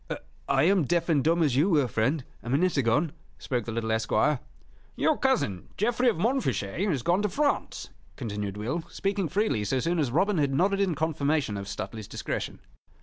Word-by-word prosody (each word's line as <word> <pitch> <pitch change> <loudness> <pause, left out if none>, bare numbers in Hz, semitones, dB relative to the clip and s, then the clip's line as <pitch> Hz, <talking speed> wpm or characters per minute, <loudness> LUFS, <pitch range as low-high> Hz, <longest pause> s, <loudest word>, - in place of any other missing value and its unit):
"I - - +3
am 185 -2 +4
deaf 170 +3 0
and 145 -5 +3
dumb 165 +2 +3
as 140 -5 +2
you 150 +8 +3
were, 150 -7 +3
friend, 125 +7 0 0.2
a 120 - -7
minute 170 +8 +2
agone," 140 +4 +2 0.3
spoke 125 -4 -2
the 115 - -4
little 110 0 -2
esquire. 115 +5 +2 0.6
"Your 315 - +2
cousin, 245 - 0
Geoffrey 240 +4 +2
of 220 - -1
Montfichet, 190 - 0
has 140 -9 -1
gone 175 +7 +2
to 210 - 0
France," 290 +8 -1 0.2
continued 105 -5 -4
Will, 125 +11 -2
speaking 195 -3 -1
freely 195 - +1
so 130 +6 0
soon 170 +5 0
as 145 -5 +1
Robin 185 - +2
had 140 -2 +1
nodded 195 +5 +2
in 190 -5 +1
confirmation 150 -6 0
of 100 0 -5
Stuteley's 100 +2 -6
discretion. - - -4
155 Hz, 185 wpm, -27 LUFS, 120-190 Hz, 0.6 s, am